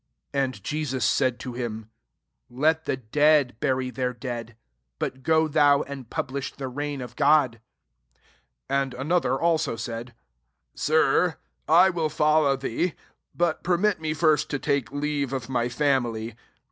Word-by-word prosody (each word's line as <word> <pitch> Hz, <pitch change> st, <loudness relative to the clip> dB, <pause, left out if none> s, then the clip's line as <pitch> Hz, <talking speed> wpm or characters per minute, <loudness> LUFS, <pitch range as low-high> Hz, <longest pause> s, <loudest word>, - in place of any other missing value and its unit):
§> -, -, -56 dB, 0.3 s
And 135 Hz, -2 st, 0 dB
iJesua'] 150 Hz, 0 st, -2 dB
said 125 Hz, +1 st, +1 dB
to 125 Hz, -, -6 dB
him, 110 Hz, -3 st, -5 dB, 0.3 s
" -, -, -54 dB
Let 160 Hz, +1 st, +3 dB
the -, -, -1 dB
dead 145 Hz, +2 st, +3 dB
bury 130 Hz, -2 st, 0 dB
their 125 Hz, -1 st, -2 dB
dead: 115 Hz, -2 st, -6 dB, 0.4 s
but 130 Hz, -, -4 dB
go 160 Hz, +2 st, +3 dB
thou, 145 Hz, -2 st, +4 dB
and 135 Hz, -4 st, -9 dB
publish 135 Hz, +1 st, -3 dB
the 135 Hz, -1 st, -6 dB
reign 145 Hz, +1 st, -4 dB
of 125 Hz, -1 st, -8 dB
God." 140 Hz, -5 st, +3 dB, 1.1 s
61 140 Hz, +1 st, +1 dB
And 135 Hz, -2 st, -4 dB
another 135 Hz, -1 st, 0 dB
also 160 Hz, -6 st, +1 dB
said, 115 Hz, +1 st, -6 dB, 0.6 s
"Sir, 160 Hz, +2 st, +2 dB, 0.3 s
I 180 Hz, +4 st, +6 dB
will 165 Hz, -3 st, -1 dB
follow 150 Hz, -2 st, +3 dB
thee; 135 Hz, +6 st, -2 dB, 0.4 s
but 170 Hz, -2 st, 0 dB
permit 185 Hz, +1 st, +1 dB
me 155 Hz, -1 st, -2 dB
first 155 Hz, -1 st, +2 dB
to 145 Hz, -, -1 dB
take 140 Hz, -2 st, -1 dB
leave 145 Hz, -2 st, -2 dB
of 130 Hz, -3 st, -4 dB
my 120 Hz, -2 st, 0 dB
family." 120 Hz, -4 st, 0 dB
140 Hz, 150 wpm, -25 LUFS, 125-155 Hz, 1.1 s, I